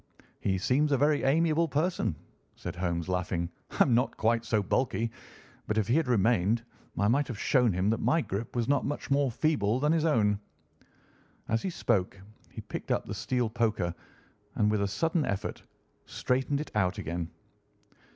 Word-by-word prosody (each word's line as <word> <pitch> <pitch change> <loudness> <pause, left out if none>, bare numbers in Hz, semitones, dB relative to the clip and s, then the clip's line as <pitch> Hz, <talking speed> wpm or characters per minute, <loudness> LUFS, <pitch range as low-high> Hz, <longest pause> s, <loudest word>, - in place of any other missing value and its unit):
"He 95 -1 0
seems 140 +10 +2
a 140 - +4
very 145 +2 +3
amiable 160 +4 +3
person," 155 - 0 0.4
said - - -6
Holmes, 85 -1 -2
laughing. 90 -1 -1 0.2
"I - - +3
am 125 - +1
not 125 +3 +1
quite 115 +1 +2
so 110 -2 +1
bulky, 115 +1 0 0.6
but 110 - -1
if 105 -2 +1
he 120 - +2
had 160 -3 +2
remained 115 -1 +2 0.3
I 100 - +2
might 140 +6 +2
have 120 - -5
shown 125 0 +3
him 95 +4 +1
that 115 - 0
my 165 - +2
grip 110 -1 -5
was 120 -1 0
not 140 +1 +2
much 145 -1 -4
more 140 -1 +3
feeble 125 -3 +1
than 150 +2 +2
his 165 -1 +2
own." 105 -10 +2 1.1
As 115 0 +1
he 190 - -2
spoke 100 - 0 0.3
he - - -8
picked - - -7
up - - 0
the - - -5
steel 125 -2 -1
poker 110 -6 0 0.6
and, 105 0 +2
with 105 -1 +1
a 100 - +1
sudden 160 - 0
effort, 100 -7 -3 0.5
straightened 130 +3 0
it 150 - -6
out 95 -4 +1
again. 85 +1 -4
115 Hz, 180 wpm, -29 LUFS, 100-140 Hz, 1.1 s, a